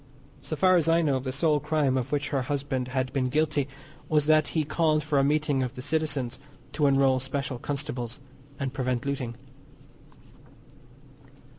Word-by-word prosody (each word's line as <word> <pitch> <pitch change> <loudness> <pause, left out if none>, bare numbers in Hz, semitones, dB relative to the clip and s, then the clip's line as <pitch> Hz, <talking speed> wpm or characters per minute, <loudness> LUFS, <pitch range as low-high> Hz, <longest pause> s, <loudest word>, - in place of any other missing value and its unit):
So 155 - -4
far 185 +4 +4
as 165 -1 +2
I 165 +1 +4
know 140 -4 +2
the 130 0 -4
sole 150 +2 +2
crime 150 -3 +1
of 130 +1 -2
which 145 -1 -1
her 135 -2 0
husband 135 -1 -2
had 130 0 -2
been 130 -2 +1
guilty 150 0 +1 0.4
was 150 -2 +3
that 155 -1 +4
he 155 - +3
called 155 0 +1
for 150 -2 +1
a - - +3
meeting 145 -1 +1
of 130 +1 -3
the 125 - -6
citizens 145 -5 -1 0.3
to 150 -2 +2
enrol 135 -1 +4
special 130 -1 -3
constables 130 -2 -3 0.4
and 135 -1 -2
prevent 125 -2 -1
looting. 130 -4 -3
140 Hz, 165 wpm, -27 LUFS, 130-155 Hz, 0.4 s, far